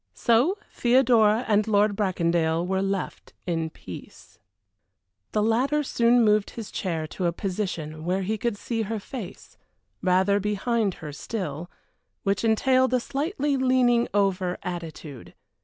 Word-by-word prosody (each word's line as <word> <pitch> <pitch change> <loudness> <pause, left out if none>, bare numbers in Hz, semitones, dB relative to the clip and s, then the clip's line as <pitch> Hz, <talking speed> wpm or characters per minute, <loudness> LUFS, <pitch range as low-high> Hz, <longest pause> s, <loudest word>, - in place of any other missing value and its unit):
So 245 - +3 0.2
Theodora 240 -2 +4
and 210 0 +2
Lord 205 -1 +3
Bracondale 170 -4 +1
were 190 +1 0
left 195 -1 -3
in 165 -2 -1
peace. - - -12 0.9
The 210 - +1
latter 260 +7 +2
soon 240 -2 +3
moved 210 -1 +3
his 225 -3 -8
chair 165 -4 -2
to 180 +1 -2
a - - +1
position 170 -5 -4
where 185 +3 0
he 215 +4 -1
could 220 0 -2
see 225 +2 -3
her 220 +1 -3
face, 210 -1 -9 0.4
rather 190 +2 +3
behind 210 0 0
her 150 - -6
still, 170 -2 -5 0.5
which 200 +2 0
entailed 255 +3 +3
a - - +3
slightly 285 +2 -1
leaning 255 -2 +3
over 190 -3 +1
attitude. 160 -6 -7
205 Hz, 135 wpm, -25 LUFS, 180-235 Hz, 0.9 s, Theodora